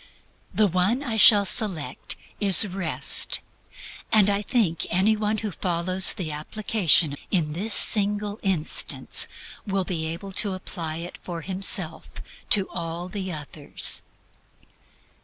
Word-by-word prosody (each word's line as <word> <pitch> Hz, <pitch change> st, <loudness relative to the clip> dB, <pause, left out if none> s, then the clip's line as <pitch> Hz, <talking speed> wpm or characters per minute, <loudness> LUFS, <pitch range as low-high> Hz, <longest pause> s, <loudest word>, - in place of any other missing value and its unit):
The 215 Hz, -, +1 dB
one 195 Hz, -, 0 dB
I 235 Hz, -5 st, -4 dB
shall 205 Hz, -1 st, +7 dB
select 180 Hz, -, -1 dB, 0.2 s
is 205 Hz, +1 st, +8 dB
Rest. 185 Hz, -3 st, -1 dB, 0.7 s
And 205 Hz, -2 st, +4 dB
I 200 Hz, 0 st, -1 dB
think 205 Hz, -7 st, -1 dB
any 195 Hz, +5 st, +1 dB
one 215 Hz, 0 st, -2 dB
who 215 Hz, -1 st, -5 dB
follows 185 Hz, +1 st, +2 dB
the 165 Hz, -5 st, -6 dB
application 165 Hz, -1 st, +1 dB
in 160 Hz, -6 st, -1 dB
this 205 Hz, +7 st, -2 dB
single 205 Hz, 0 st, +2 dB
instance 185 Hz, -6 st, 0 dB, 0.4 s
will 195 Hz, -1 st, -1 dB
be 160 Hz, -3 st, -4 dB
able 170 Hz, +5 st, -7 dB
to 200 Hz, -2 st, -4 dB
apply 165 Hz, -4 st, -7 dB
it 170 Hz, +1 st, -9 dB
for 170 Hz, -2 st, -7 dB
himself 190 Hz, +3 st, -2 dB, 0.4 s
to 195 Hz, -2 st, +4 dB
all 170 Hz, +1 st, -6 dB
the 190 Hz, -2 st, -5 dB
others. 150 Hz, -2 st, -1 dB
190 Hz, 125 wpm, -23 LUFS, 170-210 Hz, 0.7 s, is